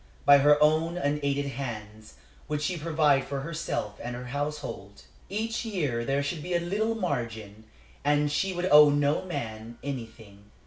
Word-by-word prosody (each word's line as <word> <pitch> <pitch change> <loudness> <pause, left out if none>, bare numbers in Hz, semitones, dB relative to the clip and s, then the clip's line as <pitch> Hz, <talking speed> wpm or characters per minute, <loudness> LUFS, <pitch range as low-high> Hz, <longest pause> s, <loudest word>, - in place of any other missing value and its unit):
By 140 0 +8
her 145 +1 +6
own 160 +3 +2
unaided 145 -2 0
hands 110 -6 -7 0.3
would 150 0 -1
she 180 +3 0
provide 155 -4 +2
for 135 0 -4
herself 155 -9 -4
and 120 0 -5
her 125 +1 -7
household. 145 -9 -5 0.3
Each 225 +4 -2
year 150 - -1
there 135 +3 0
should 155 +2 -3
be 175 +3 -2
a - - +3
little 210 +6 -1
margin, 110 - -4 0.4
and 145 0 +2
she 190 +6 0
would 175 0 -2
owe 150 0 +9
no 145 +1 +2
man 115 -9 -6
anything. 110 -6 -8
145 Hz, 160 wpm, -27 LUFS, 120-160 Hz, 0.4 s, owe